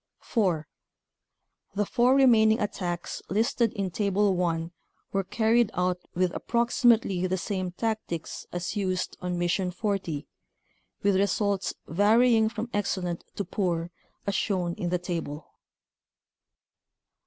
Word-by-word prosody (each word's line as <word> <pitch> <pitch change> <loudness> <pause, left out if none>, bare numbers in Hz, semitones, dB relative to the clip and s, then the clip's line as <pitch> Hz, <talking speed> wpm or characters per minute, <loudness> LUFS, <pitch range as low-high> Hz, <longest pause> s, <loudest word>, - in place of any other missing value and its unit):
4. 175 - 0 1.1
The 205 +1 +1
four 245 +5 +3
remaining 225 -5 +5
attacks 175 -4 -3
listed 230 +3 +2
in 195 -2 -2
Table 200 0 +2
1 165 -2 -1 0.4
were 195 0 +1
carried 225 +3 +2
out 180 0 +1 0.2
with 180 0 +1
approximately 235 -6 +2
the 185 +1 0
same 185 -1 -3
tactics 220 -6 -3
as 175 +4 -3
used 185 -3 -1
on 180 -1 -2
Mission 175 +2 0
40, 180 -5 -2 0.8
with 200 -1 +3
results 200 0 +1
varying 220 +5 +4
from 225 +1 -4
excellent 180 -4 -1
to 200 - -2
poor 175 -3 -1 0.3
as 200 - 0
shown 185 -4 0
in 175 -2 -3
the 180 - +1
table. 165 -4 -5
195 Hz, 120 wpm, -27 LUFS, 175-220 Hz, 1.1 s, remaining